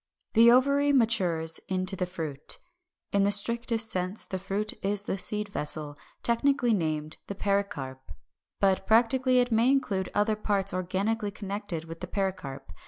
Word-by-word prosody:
= - - -51
The 230 +1 +7
ovary 280 +3 +4
matures 180 - +1
into 185 +1 0
the 180 -1 -2
Fruit. 160 -6 -3 0.5
In 200 - +2
the 200 - +3
strictest 230 +2 +1
sense 185 +3 -2
the 190 - -4
fruit 195 +3 -3
is 200 +1 0
the - - -1
seed 210 +2 -1
vessel, 150 -4 -1 0.3
technically 245 0 +2
named 155 -4 -2
the 200 - -5
PERICARP. 195 -11 -2 0.6
But 195 -1 +2
practically 250 +3 +4
it 245 -1 +3
may 230 +3 +4
include 200 -9 +1
other 210 +1 +2
parts 200 -2 -1
organically 200 +4 -1
connected 200 -4 -5
with 165 0 -9
the 180 - -5
pericarp. 185 - -4
200 Hz, 155 wpm, -28 LUFS, 180-225 Hz, 0.6 s, The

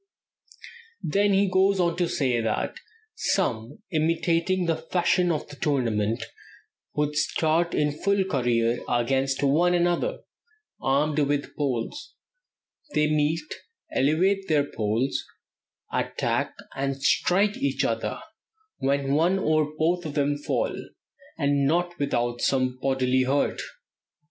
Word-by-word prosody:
Then 200 +5 +2
he 195 +1 +3
goes 190 +1 +3
on 170 -2 +2
to 175 -2 +1
say 125 -4 +1
that 110 - -2 0.4
some, 135 - -1
imitating 165 +3 +1
the 165 -1 +1
fashion 175 +1 +1
of 155 -2 -2
the 145 - -11
tournament, 115 -8 0 0.7
would 150 0 0
start 160 +3 +1
in 150 0 +2
full 200 +6 +1
career 120 -8 +1
against 135 +3 +1
one 170 +6 +3
another, 175 - 0 0.6
armed 145 +3 +1
with 145 0 -1
poles; 140 - -3 0.8
"they 150 0 +3
meet, 155 +1 +1 0.5
elevate 185 +8 +2
their 150 -2 +3
poles, 115 +1 -1 0.7
attack - - -1 0.2
and 135 0 -2
strike 200 +8 +3
each 135 -1 0
other, 115 -2 -2 0.6
when 140 0 0
one 170 +6 +3
or 155 -4 +1
both 170 +2 +1
of 145 - -7
them 145 0 +1
fall, 145 - -1 0.6
and 140 -1 +2
not 175 +3 0
without 120 -4 -1
some 130 -1 +1
bodily 130 -1 +2
hurt." 135 +2 0
150 Hz, 120 wpm, -25 LUFS, 135-175 Hz, 0.8 s, he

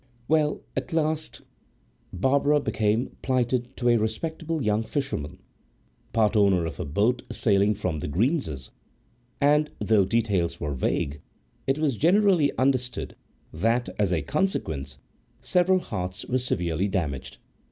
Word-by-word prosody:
Well, 150 -1 +2
at 130 +3 -3
last 155 -1 -1 0.7
Barbara 140 +8 +2
became 110 -2 0
plighted 125 -1 0
to 120 -1 +1
a 120 - +5
respectable 160 +8 -2
young 105 0 +2
fisherman, 115 - -3 0.7
part 110 0 +2
owner 100 -5 +4
of 80 -4 -6
a 90 - -2
boat 105 - +1
sailing 100 -1 +2
from 90 -6 -2
The - - -4
Greenses, 85 - -1 0.7
and, 150 +1 +3
though 105 -3 +3
details 100 -5 0
were 75 -1 -2
vague, 70 +2 -1 0.5
it 135 +1 +2
was 150 -6 0
generally 180 - +4
understood 130 -2 0 0.4
that, 115 +9 +1
as 100 -3 +2
a 80 -5 0
consequence, 70 - -2 0.4
several 180 +1 +3
hearts 90 - -4
were 130 - 0
severely 90 -7 -1
damaged. 80 -10 -3
115 Hz, 130 wpm, -26 LUFS, 90-140 Hz, 0.7 s, a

